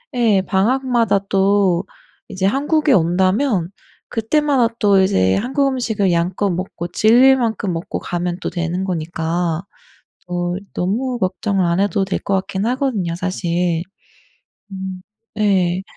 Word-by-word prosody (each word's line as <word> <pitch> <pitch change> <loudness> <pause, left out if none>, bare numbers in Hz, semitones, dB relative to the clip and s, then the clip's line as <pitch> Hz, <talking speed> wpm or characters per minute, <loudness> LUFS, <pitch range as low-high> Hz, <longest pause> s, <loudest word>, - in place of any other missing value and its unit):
예 220 -6 +3
방학마다 230 +2 +1
또 195 -2 +2 0.4
이제 190 +1 -1
한국에 295 +5 +1
온다면 185 +3 +2 0.4
그때마다 245 0 +1
또 200 -2 +4
이제 95 - +2
한국 270 +5 0
음식을 220 -8 0
양껏 180 +4 0
먹고 175 -1 -4
질릴 245 +8 +5
만큼 220 -5 -1
먹고 165 +1 -4
가면 175 0 -3
또 - - -2
되는 175 +1 -2
거니까 170 -1 -2 0.7
또 175 0 -2 0.2
너무 240 +7 -1
걱정을 190 0 0
안 170 +3 +1
해도 200 -1 +1
될 190 - -2
것 195 - -1
같긴 190 +1 -2
하거든요 235 -9 -1
사실. 175 -2 -1 0.9
음 190 -1 -6 0.4
네. 190 -4 +1
190 Hz, 245 characters per minute, -19 LUFS, 175-230 Hz, 0.9 s, 질릴